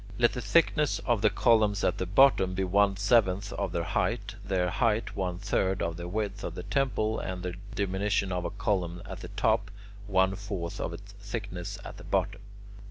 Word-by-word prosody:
Let 120 0 +3
the 125 - -4
thickness 150 +6 +3
of 120 -4 +2
the 105 - +5
columns 105 -4 +3
at - - +1
the 95 - -2
bottom 95 -3 +4
be 95 - 0
one 100 +1 +3
seventh 100 -1 +2
of 100 - -2
their 85 - -1
height, 85 - -1
their 90 -2 0
height 115 +1 0
one 90 -2 -2
third 95 0 0
of 85 -1 -2
the 85 +1 -6
width 105 +1 -3
of - - -4
the - - -6
temple, 120 -6 0
and 90 -1 -5
the 90 -1 -3 0.2
diminution 100 0 0
of 90 -1 -1
a 85 - -2
column 95 -4 -2
at 95 -1 -7
the - - -7
top, 100 - +1 0.4
one 95 -1 +3
fourth 100 -4 -5
of - - -2
its 100 0 -10
thickness 100 -4 -5
at - - -8
the - - -11
bottom. - - -1
100 Hz, 195 wpm, -29 LUFS, 90-105 Hz, 0.4 s, the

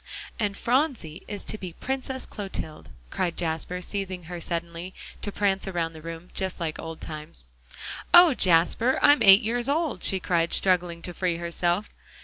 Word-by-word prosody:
"And 205 -2 -1
Phronsie 240 - 0
is 205 -2 -5
to 215 - -2
be 180 -3 -7
Princess 265 +2 -4
Clotilde," 190 -7 -7 0.2
cried 175 -2 -2
Jasper, 170 +2 -2
seizing 190 -2 -4
her 175 +1 -7
suddenly, 170 +2 -4 0.3
to 205 - -3
prance 195 -1 0
around 170 -3 -2
the 160 - -11
room, 165 +2 -8
just 190 -1 -2
like 160 -2 -3
old 165 0 -7
times. 150 - -9 0.6
"Oh, 350 -3 +8
Jasper! 185 +6 +3
I'm 290 0 +6
eight 195 +2 +9
years 240 +3 0
old," 300 - 0
she 190 - +4
cried, 170 -2 0
struggling 175 -3 +1
to 180 - -4
free 175 -1 -1
herself. 175 +3 -1
180 Hz, 160 wpm, -26 LUFS, 170-210 Hz, 0.6 s, eight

